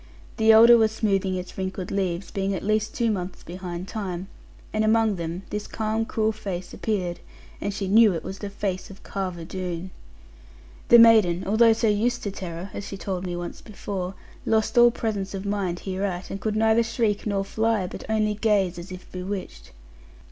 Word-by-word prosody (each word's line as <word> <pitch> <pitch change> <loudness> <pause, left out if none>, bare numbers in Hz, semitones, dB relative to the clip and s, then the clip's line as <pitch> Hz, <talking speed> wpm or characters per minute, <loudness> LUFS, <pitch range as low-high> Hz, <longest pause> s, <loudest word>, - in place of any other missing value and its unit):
The 220 -1 +5
elder 230 +2 +8
was 220 -1 +3
smoothing 195 -4 0
its 180 0 -6
wrinkled 190 -1 -4
leaves, 185 -2 -2
being 195 0 -1
at 180 - -5
least 215 +1 0
two 235 -2 +1
months 185 -2 -4
behind 180 +1 -6
time; 190 -3 -5 0.4
and 215 0 +1
among 220 -2 +3
them 170 +2 -4
this 210 0 -3
calm 220 0 -1
cruel 220 -1 0
face 190 -4 -6
appeared; 185 -6 -2 0.4
and 200 - -1
she 200 -1 -3
knew 215 +2 +6
it 165 - -4
was 190 +2 -6
the 205 - -5
face 195 -2 -3
of 195 - -13
Carver 185 -4 -4
Doone. 180 0 -5 1.0
The 235 - +9
maiden, 215 -6 +6
although 225 +3 +5
so 225 0 0
used 230 +4 +1
to 200 - -2
terror 180 -1 -6
(as 200 - -6
she 195 - -6
told 185 -1 -4
me 175 - -3
once 175 0 -6
before), 195 -3 -5 0.3
lost 220 +3 +1
all 240 0 +8
presence 205 -4 -3
of 195 +1 -5
mind 195 -4 -2
hereat, 190 -1 -3
and 195 - -5
could 215 -1 -1
neither 220 +1 +4
shriek 225 -2 0
nor 200 -1 0
fly, 220 -1 0
but - - -7
only 215 -1 +1
gaze, 200 -4 +1
as 175 +3 -9
if 185 0 -9
bewitched. 185 - -6
195 Hz, 185 wpm, -25 LUFS, 185-220 Hz, 1.0 s, The